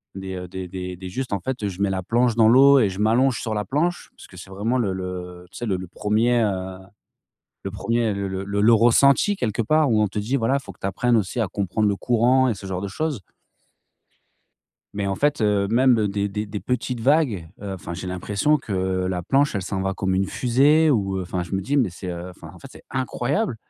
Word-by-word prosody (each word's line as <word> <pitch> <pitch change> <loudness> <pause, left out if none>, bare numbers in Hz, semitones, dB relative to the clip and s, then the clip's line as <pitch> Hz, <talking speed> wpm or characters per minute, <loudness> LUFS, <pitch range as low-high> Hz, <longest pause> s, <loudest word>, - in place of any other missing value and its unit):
des, 95 -1 -6
heu, 90 0 -6
des 90 0 -6
des 95 +1 -8
juste 130 +4 -4
en 100 - -1
fait, 120 0 -3
je 95 0 -6
mets 100 - +2
la 95 -1 -2
planche 120 +3 +1
dans 115 -2 +5
l'eau 135 +4 +7
et 110 - +3
je 95 +1 -7
m'allonge 120 +4 +2
sur 110 - -3
la 105 -1 -2
planche 170 +6 -1
parce - - -14
que 95 - -15
c'est 95 +2 -11
vraiment 105 +6 -1
le 100 -6 0
le, 90 -1 -6
tu - - -11
sais? 120 - -4
Le 100 -5 0
1er, 110 +5 +1
heu, 95 -3 -2 0.9
le 95 - -4
1er 115 +2 -1
le 100 0 -3
le 95 0 -4
le 100 +1 -2
le 115 - +6
ressenti 135 - +4
quelque 115 - -2
part 155 +5 +2
où 110 -2 +3
on 105 - +2
te 100 - -5
dit 115 +7 -1
voilà: 130 +2 +1
«Faut 115 -8 -10
que - - -29
tu - - -3
apprennes 120 +5 +1
aussi 105 +4 -2
à 110 - 0
comprendre 105 +2 -1
le 100 - 0
courant 125 +4 +3
et 115 - 0
ce 95 - -11
genre 95 -1 -3
de 100 - -4
choses». 145 +4 -3 1.7
Mais 100 -1 -2
en 95 - -2
fait, 145 +2 +1
heu, 105 -2 +2
même 120 -2 +3
des 100 0 -1
des 105 +2 -4
des 105 0 -5
petites 125 -1 -2
vagues, 125 - +1
heu, 100 -1 -5
enfin, 85 -1 -7
j'ai 90 +1 -6
l'impression 100 +11 0
que 110 - -7 0.3
la 90 -1 -2
planche, 140 - +2
elle 95 - -2
s'en 95 0 -3
va 95 0 -1
comme 95 -1 -1
une 95 +1 +1
fusée 140 +9 +3
ou 95 -8 +1
enfin, 90 0 -3
je 85 - -10
me 95 - 0
dis: 135 +10 -1
«Mais 125 -9 +2
c'est, 90 +1 -6
enfin, 85 -2 -9
en - - -13
fait, 135 - -11
c'est - - -14
incroyable» 130 - -1
105 Hz, 235 wpm, -23 LUFS, 95-125 Hz, 1.7 s, l'eau